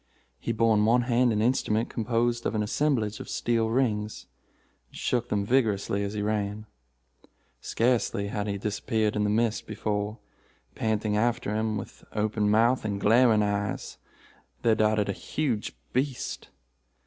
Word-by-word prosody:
He - - -2
bore 115 0 +3
in 105 - +3
one 120 +3 +4
hand 120 0 +3
an 105 0 +1
instrument 115 -2 +1
composed 120 +1 0
of - - -2
an 105 - +1
assemblage 110 -2 0
of - - -8
steel 115 -2 0
rings, 110 -4 -1 0.6
and - - -13
shook 120 -1 -1
them 100 -1 0
vigorously 105 -4 +1
as 100 +1 -3
he 105 - -1
ran. 105 0 -2 0.9
Scarcely 115 -4 0
had 105 0 -3
he 100 -1 -2
disappeared 105 +1 -1
in 105 - +1
the - - +1
mist 110 +1 0
before, 105 0 -2 0.6
panting 110 -1 0
after 115 -1 0
him, 110 0 0
with 100 - -9
open 105 -1 0
mouth 115 +4 +3
and 100 -2 -2
glaring 110 +1 +5
eyes, 105 -1 -2 0.6
there 115 - +4
darted 110 -1 +2
a 100 - -1
huge 125 -2 -2 0.2
beast. 130 0 -2
110 Hz, 150 wpm, -27 LUFS, 105-120 Hz, 0.9 s, glaring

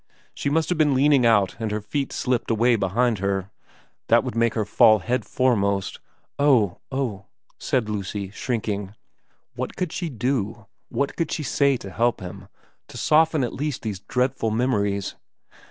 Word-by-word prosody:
She - - -2
must 160 +2 +1
have 180 -3 -1
been 150 -3 +4
leaning 135 -2 +4
out 105 -5 +3
and 110 -1 -2
her 105 +1 -2
feet 135 +7 -3
slipped 125 -2 -1
away 115 +2 +3
behind 110 +2 +1
her. 100 0 -2 0.6
That - - +5
would - - -5
make 115 0 +2
her 110 -2 0
fall 110 +1 +5
head 120 +6 -2
foremost 100 -6 0
' - - -40
' - - -52
Oh 105 -9 +3
oh 120 -8 -3 0.2
' - - -37
said 125 -5 0
Lucy, 100 -2 -4
shrinking. 105 -3 -3 0.6
What - - -5
could 180 -3 -2
she 175 -3 -3
do, 115 -4 -2 0.2
what 140 - -1
could 165 -3 -2
she 155 - -2
say 140 0 +2
to 100 -4 -9
help 120 +5 +1
him, 90 -1 -9 0.4
to - - -10
soften 155 -1 +3
at 120 - -2
least 145 -1 -3
these 105 -4 -3
dreadful 125 +2 -1
memories 105 -4 0
115 Hz, 175 wpm, -24 LUFS, 100-135 Hz, 0.6 s, That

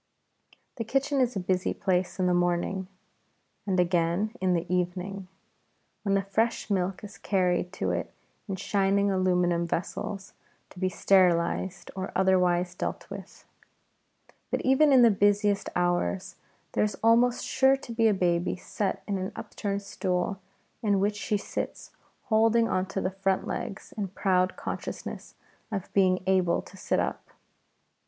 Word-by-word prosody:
The 230 - -2
kitchen 275 +4 +1
is 250 -2 +1
a - - 0
busy 185 0 0
place 180 -1 0
in 185 - +1
the 180 - +3
morning, 175 +2 0 0.8
and 190 -2 +1
again 175 +4 +1
in 185 -1 +2
the 170 - -1
evening, 180 +2 -2 0.7
when 200 -2 +1
the 195 - +1
fresh 220 +3 -1
milk 190 +1 -1
is 205 0 -10
carried 180 -2 +1
to - - -1
it - - -3 0.4
in 195 - -1
shining 200 +1 +1
aluminium 180 -2 +2
vessels 195 +4 -4 0.4
to 180 - -12
be 185 0 +1
sterilized 180 -1 +2
or 190 0 -4
otherwise 180 -1 +2
dealt - - -4
with. - - -10 1.0
But - - -1
even 270 +3 +4
in 260 -2 +7
the 230 - +7
busiest 205 0 +2
hours 175 - 0 0.4
there - - +1
is 210 -2 -1
almost 235 +2 +4
sure 270 0 +4
to 255 - -10
be 230 -1 +3
a 215 - +4
baby 175 -1 +1
set 195 +2 -3
in 200 -2 -1
an 185 +1 -3
upturned 200 0 -4
stool, 185 0 -2 0.4
in 205 -3 +2
which 205 +2 +1
she 210 0 -1
sits - - -5 0.3
holding 225 0 +3
on 185 -2 0
to 195 0 -3
the 185 - -1
front 195 0 0
legs 205 -5 -5
in 205 -2 -2
proud 185 -1 +1
consciousness - - -6 0.4
of 195 -3 -4
being 185 -2 +3
able 185 -2 +2
to - - -15
sit 190 - -1
up. - - -2
190 Hz, 150 wpm, -28 LUFS, 180-205 Hz, 1.0 s, in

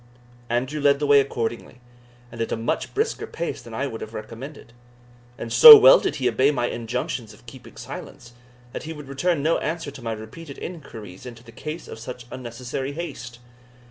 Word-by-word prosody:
Andrew 130 +5 -2
led 140 0 +4
the 145 - -2
way 145 0 +6
accordingly, 120 -2 -3 0.5
and 115 -1 -7
at 115 - -2
a - - -1
much 115 +1 -2
brisker 440 0 -1
pace 170 - -5
than 115 -1 -10
I 140 - -1
would 115 -5 -6
have 110 +1 -8
recommended. 115 +4 -9 0.6
and 115 - -6
so 455 -2 +12
well - - +8
did - - -2
he 130 -3 -1
obey 130 +4 +3
my 125 -5 0
injunctions 115 -2 -4
of 120 - -22
keeping 125 +1 -13
silence, 120 - -10 0.4
that - - -5
he 160 +1 -7
would 150 -3 -11
return 140 +3 -1
no 160 +2 +2
answer 160 -2 -4
to 135 - -12
my 115 -1 -3
repeated 135 +8 -10
inquiries 115 - -9
into 115 -1 -11
the 115 - -14
cause 155 +8 -7
of - - -9
such 125 +1 -8
unnecessary 130 +2 -6
haste. 140 -7 -7
130 Hz, 190 wpm, -23 LUFS, 115-150 Hz, 0.6 s, so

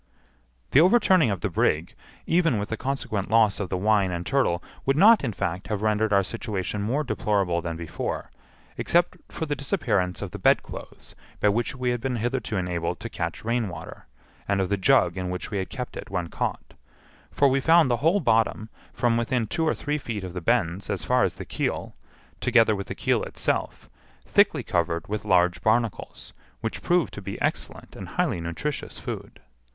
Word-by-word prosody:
The 140 - +7
overturning 185 - +5
of 100 -4 -2
the - - -1
brig, 80 +3 +1 0.3
even 165 -7 +2
with 100 +1 -3
the 110 - -1
consequent 110 -6 -3
loss 110 -2 +4
of 100 -3 -3
the 95 - -1
wine 100 0 +2
and 85 -1 -4
turtle, 130 -11 +1 0.2
would 135 +1 +1
not, 215 +3 +7
in 120 - 0
fact, 95 -1 -3
have 105 -1 -2
rendered 110 0 +1
our 100 -1 +4
situation 105 -2 -3
more 130 +9 0
deplorable 100 -9 0
than 85 -1 -4
before, 85 -1 -4 0.5
except 175 0 +2
for 160 - -3
the 145 -1 -2
disappearance 125 - -1
of - - -6
the - - -7
bedclothes - - -1 0.3
by 105 - +4
which 120 +6 0
we 125 -1 -1
had 120 -1 -2
been 130 0 -1
hitherto 115 -2 -2
enabled 90 -2 -2
to - - -7
catch 85 +3 -4
rainwater, 110 - -3 0.4
and 100 -1 +1
of 95 - 0
the 100 - +2
jug 95 -4 +3
in 90 -1 -3
which 90 +6 -5
we 100 - -1
had 95 - -4
kept 125 -2 -6
it - - -7
when 90 -3 -2
caught; - - -4 0.6
for 140 - +3
we 135 0 +2
found 165 +1 +5
the 120 - +2
whole 165 - +3
bottom, 110 - +1 0.2
from 120 -2 +1
within 115 0 0
two 160 +9 -1
or - - +2
three 150 +1 -2
feet 110 -7 -5
of 90 -2 -6
the 90 - -4
bends 100 -3 0
as 95 -5 -2
far - - +3
as - - 0
the - - -7
keel, - - -3 0.5
together 115 -3 +4
with 100 -1 -5
the - - -5
keel - - +1
itself, - - -2 0.4
thickly - - +3
covered 85 -1 -1
with 105 +1 -4
large 90 -3 +3
barnacles, 115 0 -1 0.3
which 115 - -4
proved 175 -1 +1
to 105 - -7
be 100 0 -6
excellent - - -3
and - - -8
highly 85 - 0
nutritious 85 - -4
food. - - -7
110 Hz, 190 wpm, -25 LUFS, 95-130 Hz, 0.6 s, The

